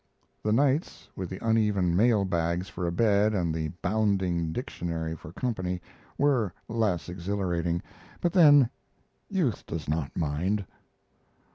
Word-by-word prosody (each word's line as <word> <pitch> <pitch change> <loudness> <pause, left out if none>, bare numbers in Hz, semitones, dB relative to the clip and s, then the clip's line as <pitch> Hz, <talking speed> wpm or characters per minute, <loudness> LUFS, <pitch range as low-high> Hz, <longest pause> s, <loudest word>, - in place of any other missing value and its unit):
The 105 - 0
nights, 140 +6 +1
with 95 -2 -4
the 95 - -5
uneven 105 -6 +2
mail 105 0 +4
bags 85 0 -1
for 90 -1 -4
a - - 0
bed 105 +2 +3
and 85 -4 0
the 80 -1 -1 0.2
bounding 95 -5 +1
dictionary 80 - -3
for 75 0 -11
company, 90 -4 -2 0.4
were 130 -9 +2 0.2
less 105 -9 0
exhilarating; 90 -2 -2 0.4
but 175 - 0
then 145 -8 +7 0.6
youth 165 - 0
does 80 -2 -5
not 75 -2 -2
mind. 90 +6 0
95 Hz, 130 wpm, -28 LUFS, 85-110 Hz, 0.6 s, then